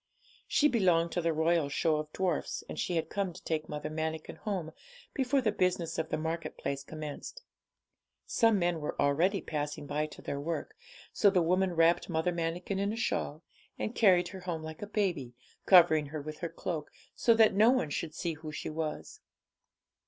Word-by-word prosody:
She 295 - +4
belonged 180 - +3
to 175 - -1
the 165 0 +1
Royal 160 -1 +2
Show 155 +2 +1
of 155 0 -5
Dwarfs, 180 -4 -1
and - - -6
she 180 - -1
had 165 - 0
come 195 -3 -2
to 185 - -13
take 155 -1 -2
Mother 150 0 -4
Manikin 160 0 -4
home 185 -7 -3 0.4
before 270 0 +1
the 220 -4 +2
business 180 -5 0
of 160 - -2
the - - 0
market 160 +1 -3
place 140 0 -3
commenced. 155 - -7 0.8
Some 225 -2 +3
men 175 -2 +1
were 150 - -4
already 170 +8 +2
passing 150 -1 -4
by 150 +2 -1
to - - -13
their 140 - -3
work; 170 - -4 0.4
so 205 - +5
the 185 -3 +3
woman 185 +2 +2
wrapped 165 +2 +3
Mother 160 +1 +1
Manikin 175 +3 -2
in 200 +1 0
a - - -3
shawl, 170 -9 -2 0.3
and 215 - -3
carried 185 -7 +4
her 190 - -8
home 175 -3 -4
like 160 0 -8
a 205 - -4
baby, 175 - -1 0.3
covering 165 -5 +7
her 155 +2 -5
with 155 +1 -7
her 170 - -3
cloak, 160 -4 -4 0.2
so 230 - +3
that 220 -2 +6
no 215 +4 +6
one 250 - +2
should 155 +2 -3
see 170 -1 -2
who 155 0 -8
she 150 - -5
was. 155 -1 -4
170 Hz, 190 wpm, -31 LUFS, 155-190 Hz, 0.8 s, covering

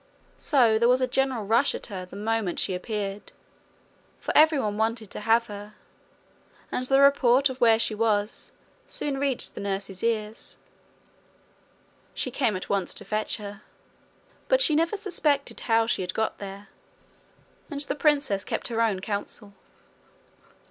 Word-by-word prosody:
So 235 -7 +3
there 235 +1 +4
was 250 +1 +4
a - - +4
general 255 -3 0
rush 230 +7 +3
at - - -6
her 185 -4 -7
the 180 - -12
moment 215 -3 -1
she 190 - 0
appeared, 200 +1 -4 0.9
for - - -4
every 310 0 +6
one 210 -6 -1
wanted 220 -1 -1
to - - -5
have 225 +2 +3
her; 205 0 -9 1.0
and 255 - -2
the 270 +1 +4
report 280 -1 +5
of 255 0 -10
where 225 -2 +6
she 225 - 0
was 210 -1 0 0.4
soon 275 -2 -3
reached 275 -3 0
the - - -7
nurse's 195 -1 -4
ears. 220 -1 -2 1.6
She - - -2
came 235 -7 +1
at 185 - -5
once 195 -3 -1
to - - -9
fetch 215 0 -1
her; 205 -1 -8 0.9
but - - +4
she 415 -11 +4
never 330 +6 +1
suspected 305 -8 0
how 225 -1 +2
she 225 - -1
had 185 0 -4
got 220 0 -1
there, 200 0 -8 1.0
and 290 -3 -4
the 285 - 0
princess 285 -9 +1
kept - - -3
her 230 -1 0
own 210 -5 +1
counsel. 205 0 -4
225 Hz, 155 wpm, -26 LUFS, 205-270 Hz, 1.6 s, every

